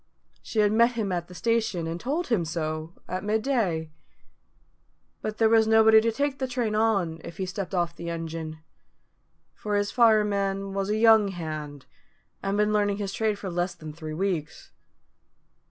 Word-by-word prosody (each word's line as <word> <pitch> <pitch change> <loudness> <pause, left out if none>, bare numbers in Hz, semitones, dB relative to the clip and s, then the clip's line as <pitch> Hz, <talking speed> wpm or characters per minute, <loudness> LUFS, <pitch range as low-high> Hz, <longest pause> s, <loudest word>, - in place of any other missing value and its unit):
She 220 - 0
had 205 -1 +3
met 235 +2 +4
him 215 -5 -2
at 175 -1 -2
the 180 - -12
station, 225 -5 0
and 165 +1 -4
told 295 - -2
him 220 -8 +2
so, 155 0 -4
at 185 +1 -4
midday. 210 - 0 1.3
But 215 0 -4
there 225 - +4
was 220 0 +4
nobody 220 0 +6
to 230 +1 +1
take 280 +4 -1
the 260 - -1
train 245 -4 -1
on, 200 -7 +1
if 170 - -9
he 190 - -2
stepped 195 +1 -4
off 170 -1 0
the 170 0 -6
engine; 165 -1 -5 1.0
for 210 -1 -3
his 205 0 0
fireman 200 -4 +2
was 195 0 -2
a 210 - +1
young 220 -2 +6
hand, 155 -6 -6 0.6
and 195 +1 -1
had 210 - +4
been 210 - 0
learning 205 -1 +1
his 200 -2 -4
trade 215 -2 0
for 195 -2 -6
less 175 +1 -1
than 155 -1 -9
three 155 -1 -7
weeks. 175 -4 -3
200 Hz, 175 wpm, -26 LUFS, 170-220 Hz, 1.3 s, nobody